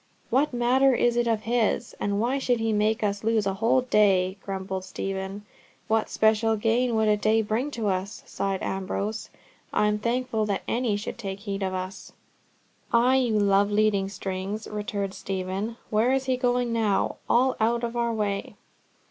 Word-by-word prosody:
"What 270 Hz, +5 st, +2 dB
matter 255 Hz, +2 st, +3 dB
is 240 Hz, 0 st, +2 dB
it 240 Hz, 0 st, +1 dB
of 225 Hz, -2 st, +1 dB
his? 230 Hz, -2 st, 0 dB
And 200 Hz, 0 st, -1 dB
why 250 Hz, +5 st, +1 dB
should 245 Hz, -3 st, +1 dB
he 225 Hz, -1 st, 0 dB
make 215 Hz, +1 st, +1 dB
us 200 Hz, 0 st, -1 dB
lose 220 Hz, -2 st, +2 dB
a 195 Hz, -, 0 dB
whole 225 Hz, +6 st, +2 dB
day?" 195 Hz, -6 st, +3 dB
grumbled 190 Hz, -1 st, -4 dB
Stephen. 195 Hz, +2 st, -5 dB, 0.4 s
"What 220 Hz, 0 st, +1 dB
special 220 Hz, +1 st, +2 dB
gain 230 Hz, +3 st, +1 dB
would 220 Hz, 0 st, +2 dB
a 210 Hz, -, +4 dB
day 215 Hz, +2 st, +2 dB
be 225 Hz, +7 st, -1 dB
to 230 Hz, -7 st, -3 dB
us?" 195 Hz, +2 st, -2 dB
sighed 195 Hz, -1 st, -3 dB
Ambrose. 200 Hz, +3 st, -3 dB, 0.4 s
"I -, -, +2 dB
am 210 Hz, 0 st, +1 dB
thankful 235 Hz, -1 st, -1 dB
that 200 Hz, -2 st, -1 dB
any 235 Hz, -3 st, 0 dB
should 210 Hz, +3 st, -6 dB
take 195 Hz, -3 st, -5 dB
heed 200 Hz, -2 st, -4 dB
for 190 Hz, -1 st, -1 dB
us." 185 Hz, +1 st, -6 dB, 0.8 s
"Ay, 245 Hz, +3 st, +4 dB
you 240 Hz, -5 st, +2 dB
love 200 Hz, 0 st, +3 dB
leading 205 Hz, -2 st, +2 dB
strings," 195 Hz, +2 st, -4 dB
returned 205 Hz, -2 st, -3 dB
Stephen. 195 Hz, +4 st, -4 dB
"Where 220 Hz, +4 st, +3 dB
is 265 Hz, 0 st, +1 dB
he 260 Hz, -1 st, +1 dB
going 245 Hz, -1 st, 0 dB
now? 215 Hz, -4 st, +1 dB
All 255 Hz, +2 st, +3 dB
out 230 Hz, +2 st, +1 dB
of 235 Hz, 0 st, -3 dB
our 235 Hz, -1 st, 0 dB
way!" 205 Hz, -3 st, -2 dB
215 Hz, 175 wpm, -26 LUFS, 200-235 Hz, 0.8 s, a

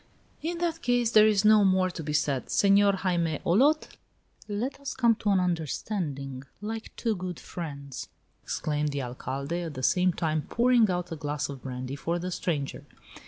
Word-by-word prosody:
"In 335 Hz, +3 st, -2 dB
that 335 Hz, -1 st, -1 dB
case 245 Hz, -2 st, +2 dB
there 215 Hz, -1 st, +7 dB
is 210 Hz, -1 st, +3 dB
no 215 Hz, -1 st, +7 dB
more 185 Hz, -1 st, +3 dB
to 170 Hz, -, -6 dB
be 150 Hz, -1 st, -4 dB
said. 140 Hz, -4 st, 0 dB
Senor 200 Hz, 0 st, +5 dB
Jaime 175 Hz, -5 st, 0 dB
Olot, 280 Hz, -, +4 dB, 0.6 s
let 230 Hz, +7 st, -3 dB
us 280 Hz, -, -5 dB
come 235 Hz, -3 st, +4 dB
to 210 Hz, -, -1 dB
an 195 Hz, -2 st, +4 dB
understanding, 160 Hz, -, -2 dB, 0.2 s
like 220 Hz, +2 st, -5 dB
two 225 Hz, -3 st, 0 dB
good 180 Hz, -2 st, -5 dB
friends," 140 Hz, -6 st, -7 dB, 0.3 s
exclaimed 150 Hz, -1 st, -1 dB
the 140 Hz, -1 st, -3 dB
Alcalde, 135 Hz, +6 st, -4 dB
at 165 Hz, -4 st, -5 dB
the 130 Hz, -, -5 dB
same 180 Hz, +4 st, +3 dB
time 155 Hz, -3 st, -1 dB
pouring 235 Hz, -2 st, +4 dB
out 180 Hz, -1 st, -2 dB
a -, -, -2 dB
glass 145 Hz, -1 st, -3 dB
of 135 Hz, -2 st, -7 dB
brandy 130 Hz, 0 st, -5 dB
for 165 Hz, +4 st, -2 dB
the 180 Hz, +1 st, -4 dB
stranger. 150 Hz, -6 st, -2 dB
180 Hz, 175 wpm, -28 LUFS, 150-215 Hz, 0.6 s, there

